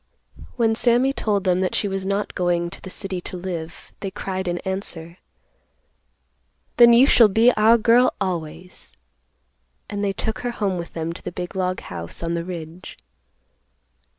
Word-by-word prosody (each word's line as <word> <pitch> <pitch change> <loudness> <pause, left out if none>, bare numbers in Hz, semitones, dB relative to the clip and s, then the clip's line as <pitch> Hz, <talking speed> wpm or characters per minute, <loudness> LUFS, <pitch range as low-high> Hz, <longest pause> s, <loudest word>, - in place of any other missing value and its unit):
When 225 -2 +2
Sammy 245 +4 +3
told 205 -6 -1
them 180 -1 +2
that 185 -1 -1
she 205 - 0
was 195 -1 -3
not 200 +1 -1
going 175 -1 0
to - - -11
the 190 - -9
city 190 -1 -4
to 180 - -7
live, 175 -2 -6
they 195 - -4
cried 190 0 -4
in 175 0 -1
answer, 180 -3 -5 1.6
"Then 235 0 +8
you 240 +3 +7
shall 235 -5 +6
be 225 +4 +4
our 220 +2 +5
girl 235 +3 +4
always," 170 - -5 1.0
and 205 0 -3
they 200 - +1
took 220 +2 -3
her 245 -1 -3
home 195 -4 -1
with 170 - -7
them 165 0 -3
to - - -11
the - - -6
big 180 +1 -6
log 185 -1 -1
house 85 - -7
on 170 0 -1
the 170 0 -2
ridge. 170 0 -8
190 Hz, 170 wpm, -22 LUFS, 175-215 Hz, 1.6 s, Then